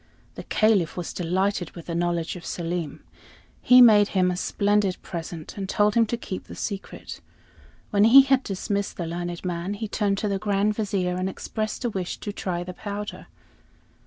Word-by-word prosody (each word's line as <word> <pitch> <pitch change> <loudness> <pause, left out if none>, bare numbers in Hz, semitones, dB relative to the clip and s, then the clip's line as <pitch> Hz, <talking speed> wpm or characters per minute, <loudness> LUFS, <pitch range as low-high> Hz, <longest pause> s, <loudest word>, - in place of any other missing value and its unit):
The - - -7
Caliph 210 -7 +2
was 175 - -4
delighted 185 +1 -1
with 170 - -9
the 170 - -5
knowledge 170 0 -1
of 175 - -9
Selim. 170 -2 -4 0.6
He 250 0 +8
made 210 -3 +7
him 180 -1 +3
a - - -2
splendid 200 +1 +1
present, 165 -2 -7
and 195 -1 -4
told 210 +1 +2
him 230 0 +3
to 235 - -2
keep 190 -5 -6
the - - -10
secret. 200 -2 -6 0.7
When 205 0 +4
he 265 +4 +9
had 270 -1 +3
dismissed 200 -1 -3
the 170 - -3
learned 175 +1 -5
man, 180 +3 -3
he 220 +2 -4
turned 200 -1 0
to 210 - -1
the 200 -1 -1
Grand 205 0 +1
Vizier, 195 -4 -1
and 185 +1 -1
expressed 215 +5 -4
a - - +2
wish 185 -3 -4
to 205 - -6
try 175 -3 -3
the 180 +1 -7
powder. 205 +2 -6
195 Hz, 185 wpm, -25 LUFS, 175-210 Hz, 0.7 s, he